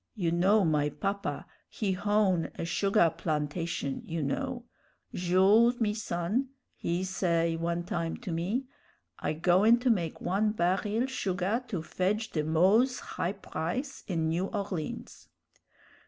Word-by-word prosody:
You 175 -6 0
know 190 +4 +4
my 150 -2 +2
papa 200 +5 -3 0.2
he 205 -3 -2
hown 195 -2 +1
a - - -4
sugah 170 +1 +2
plantation, 150 -2 -2
you 165 -2 -3
know. 245 - -3 0.5
'Jules, 195 +7 +4
me 210 -3 +1
son,' 210 +5 -1 0.2
he 175 +2 -2
say 170 -3 +1
one 170 +1 -2
time 170 -1 -3
to 225 -7 -6
me, 190 +11 -1 0.5
'I - - -1
goin' 185 +8 +4
to 250 -1 +3
make 170 -7 -1
one 210 +3 +1
baril 205 +7 +1
sugah 200 -1 -1
to 180 -8 -3
fedge 210 +6 -1
the 155 - -1
moze 195 - +3
high 180 - -3
price 210 - -4
in 165 -4 0
New 170 +4 0
Orleans.' 195 -7 -5
185 Hz, 135 wpm, -29 LUFS, 170-215 Hz, 0.5 s, know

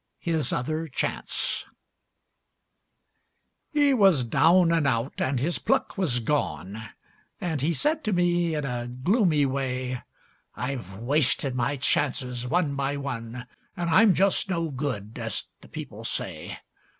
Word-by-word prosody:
HIS 160 -6 0
OTHER 155 +6 -1
CHANCE 130 - -2 2.1
He 290 -2 +4
was 195 - +5
down 165 +8 +4
and 165 -4 +2
out, 115 +1 -1
and 130 -1 +1
his 165 +7 0
pluck - - 0
was 160 -11 +1
gone, 110 - -2 0.5
And 160 -6 -2
he 155 +5 +2
said 305 - +1
to 215 - +1
me 175 -2 +2
in 150 -2 -2
a 120 -2 -3
gloomy 150 - +2
way: 130 -2 -2 0.5
"I've 125 -7 -4
wasted 135 +2 +1
my 125 +3 0
chances, 125 -3 0
one 160 0 +1
by 140 +1 -1
one, 125 -3 -5 0.3
And 170 -1 -1
I'm 205 +3 +6
just 195 0 +2
no 165 -4 -1
good, 125 -5 -4
as 115 -3 -2 0.2
the - - -14
people - - -8
say. - - -3
140 Hz, 135 wpm, -26 LUFS, 125-170 Hz, 2.1 s, I'm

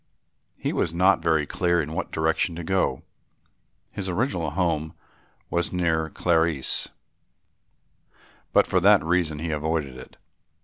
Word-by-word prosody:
He - - -2
was 85 - -1
not 90 0 +4
very 80 -3 +2
clear 85 +2 +1
in 75 0 -3
what - - -4
direction 80 +2 0
to 85 - -6
go. 95 -7 0 0.9
His 95 -1 -5
original 90 - -1
home 80 -2 -1 0.6
was 85 0 0
near 80 -3 0
Carlisle, 80 -5 +1 1.6
but - - +5
for 95 - +1
that 100 +2 +5
reason 80 -2 0
he 80 +2 -3
avoided 75 -3 -2
it. - - -13
85 Hz, 130 wpm, -25 LUFS, 80-90 Hz, 1.6 s, but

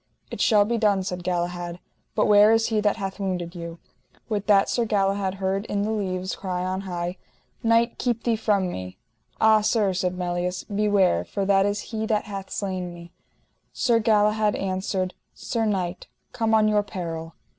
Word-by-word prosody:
It - - -4
shall 210 -3 +5
be 230 +2 -1
done, 205 -3 +2
said 180 -2 -4
Galahad, 175 0 -2 0.4
but - - +3
where 210 +1 +6
is 225 0 +3
he 215 -2 +1
that 210 -1 +2
hath 195 -1 -5
wounded 180 -3 -3
you? 170 -1 -7 0.5
With 210 -2 -2
that 200 -2 +5
Sir 240 - +1
Galahad 195 -3 0
heard 195 +1 -1
in 200 0 -1
the 215 - -1
leaves 185 -3 -2
cry 180 -2 -3
on 185 +1 -2
high: 175 -1 -4 0.4
Knight, 230 +1 +2
keep 235 -2 -1
thee 235 -2 +2
from 205 -4 +1
me. 95 - -7 0.4
Ah 220 -1 +5
sir, 210 -2 +2
said 180 0 -1
Melias, 180 0 -2
beware, 200 - +2
for 195 - -3
that 195 0 +4
is 205 0 -1
he 220 0 -2
that 215 -1 +1
hath 195 -2 -6
slain 185 -3 -3
me. 170 0 -11 0.6
Sir 235 -3 +2
Galahad 215 -1 +3
answered: 185 -1 -2 0.2
Sir 230 -2 -2
knight, 185 -4 -2 0.3
come 225 -1 +1
on 215 -1 +4
your 210 -1 +3
peril. 165 -4 -6
195 Hz, 175 wpm, -25 LUFS, 180-215 Hz, 0.6 s, where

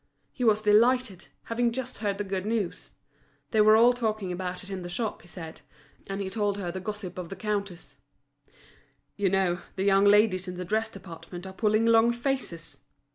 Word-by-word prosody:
He 250 - -5
was 215 -2 +3
delighted, 220 -1 +3 0.2
having 235 +1 0
just 255 +1 -5
heard 205 -2 -1
the 205 - -2
good 190 -1 -3
news; 215 -3 -2 0.6
they 220 - +4
were 215 +1 +7
all 235 +2 +6
talking 215 -5 -2
about 180 0 -4
it 195 - -9
in 190 -1 -4
the 175 - -6
shop, 210 +4 -3
he - - -18
said. 160 -1 -9 0.5
And 195 0 -4
he 195 - -3
told 205 +1 -1
her 180 -4 -3
the 190 - -5
gossip 190 -2 -6
of 175 -2 -6
the 195 - -6
counters. 200 -4 -4 1.2
"You 200 -2 +1
know, 180 -2 +1
the 190 - -1
young 195 0 +4
ladies 205 -2 +4
in 180 0 -6
the 180 - -4
dress 220 +4 0
department 175 -2 -10
are 190 - -8
pulling 215 +2 +2
long 230 0 +5
faces!" 235 - -4
200 Hz, 190 wpm, -27 LUFS, 185-220 Hz, 1.2 s, were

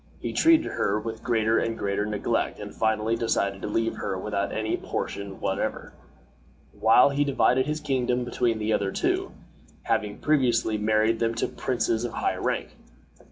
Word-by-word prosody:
He - - -4
treated 325 -1 +5
her 105 +2 0
with 110 +1 -6
greater 115 -1 +2
and 115 0 -2
greater 100 +1 -1
neglect 105 -1 -1
and - - -7
finally 110 0 +1
decided 100 -4 -1
to - - -4
leave 115 +2 -1
her 95 - -3
without 100 +1 -2
any 110 0 -1
portion 100 -1 -5
whatever, - - -3 0.8
while 125 +5 +5
he 140 +1 +1
divided 130 -1 +2
his 150 +1 -1
kingdom 125 -4 0
between 120 -2 0
the 110 0 0
other 100 -1 0
two, - - -1 0.5
having 105 -1 -1
previously 120 -7 +1
married 110 +1 +2
them 115 0 0
to - - 0
princes 115 -2 -1
of 120 - -3
high - - -1
rank. - - -2
115 Hz, 160 wpm, -26 LUFS, 105-120 Hz, 0.8 s, treated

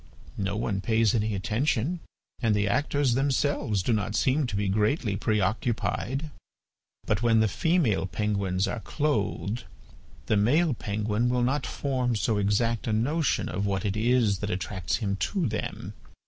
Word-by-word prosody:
No 100 0 -1
one 105 -3 -1
pays 110 0 +2
any 110 -2 0
attention 120 - 0 0.4
and 115 -4 +2
the 105 0 +1
actors 145 +2 +1
themselves 135 -6 +1
do 115 - +1
not 105 0 -1
seem 135 +4 +2
to 105 - -4
be 100 0 0
greatly 105 - +1
preoccupied. 110 - -1 0.7
But 105 0 0
when 115 -2 +4
the 110 - +4
female 125 - +1
penguins 100 0 -1
are 120 - -3
clothed, 115 -5 -1 0.6
the 110 - +2
male 145 +10 +3
penguin 110 +2 -1
will 125 0 +1
not 135 +1 0
form 130 -4 -1
so 110 0 0
exact 105 +3 +1
a 110 - +1
notion 145 +8 +1
of 100 +2 -2
what 95 -1 -1
it 100 0 0
is 110 -3 +2
that 105 - -3
attracts 95 0 -2
him 100 -4 -2
to 185 - -1
them. 110 -4 -4
110 Hz, 155 wpm, -27 LUFS, 100-125 Hz, 0.7 s, when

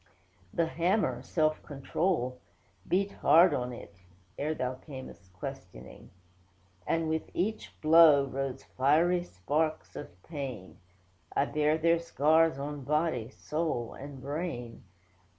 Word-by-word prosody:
'The 170 - +1
hammer, 165 - 0
Self 155 +2 0
Control, 140 -2 -2 0.5
beat 195 +2 +1
hard 170 +1 +5
on 125 -2 -2
it; 120 - -11 0.4
(Ere 155 +2 -2
Thou 125 -2 -2
cam'st 130 - -11
questioning,) 90 - -9 0.8
And 165 -1 +1
with 160 0 -2
each 215 +5 -3
blow, 155 -3 +7
rose 135 -1 -4
fiery 160 +7 +2
sparks 155 - -2
of - - -7
pain; 135 - -7 0.6
I 140 - +3
bear 150 +1 +1
their 165 +1 +3
scars, 160 -1 +3
on 145 +1 -5
body, 150 -5 0
soul, 150 -4 -3
and 140 0 -9
brain. 140 -4 -5
150 Hz, 115 wpm, -30 LUFS, 130-165 Hz, 0.8 s, blow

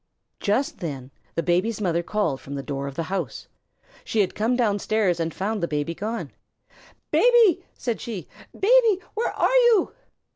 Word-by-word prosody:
Just 270 +9 0
then 140 -7 -5 0.2
the 165 - 0
Baby's 185 +7 +1
mother 170 -4 +1
called 170 -7 -1
from 140 - -7
the 140 - -4
door 140 -1 -4
of 140 - -7
the 165 - -2
house. 170 - -4 0.6
She 220 - +1
had 190 - 0
come 225 +4 +1
downstairs 210 -5 +1
and 165 0 -1
found 205 +3 -2
the 170 - 0
Baby 150 +1 -2
gone. 220 +6 -4 0.8
"Baby!" 460 -7 +5
said 235 -3 -3
she. 215 -7 -6 0.2
"Baby! 450 -2 +4
Where 445 +3 -1
are - - +1
you?" 440 -6 +3
205 Hz, 160 wpm, -24 LUFS, 165-245 Hz, 0.8 s, Baby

